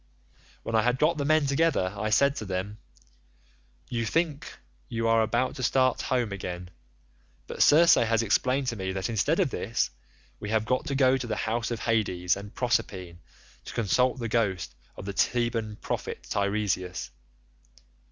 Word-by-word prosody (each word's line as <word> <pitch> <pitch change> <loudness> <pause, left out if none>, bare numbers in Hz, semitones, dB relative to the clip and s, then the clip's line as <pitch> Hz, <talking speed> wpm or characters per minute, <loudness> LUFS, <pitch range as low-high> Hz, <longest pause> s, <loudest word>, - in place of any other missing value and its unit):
"When 115 - -5
I 110 - +4
had 125 +3 +1
got 155 +3 +2
the 140 - -1
men 155 0 +3
together 140 - +1
I 110 +1 -2
said 140 +6 +3
to 110 - -4
them, 95 +2 -4 1.1
'You 115 -2 -2
think 150 +5 -1 0.3
you 115 0 -1
are 115 0 +4
about 120 +4 0
to - - -5
start 130 0 +2
home 120 -5 0
again, 90 -2 -6 0.7
but - - -5
Circe 165 +3 +7
has 115 -1 +2
explained 130 +5 +1
to 115 - -3
me 95 -2 -3
that 95 +4 -2
instead 140 - +1
of 175 -9 +2
this, 115 +1 -1 0.5
we 105 - -6
have 110 0 +1
got 125 +3 0
to 140 - -1
go 135 -1 +4
to 125 -2 -5
the 110 - -2
house 115 +2 -1
of 115 -2 -4
Hades 95 -6 +1
and 100 +1 -9
Proserpine 95 -8 -1 0.5
to - - -8
consult 125 +4 +2
the 120 -2 -3
ghost 95 - -1 0.2
of - - -8
the 100 - -4
Theban 115 0 0
prophet - - -5
Teiresias. 100 -5 -1
115 Hz, 170 wpm, -27 LUFS, 100-130 Hz, 1.1 s, Circe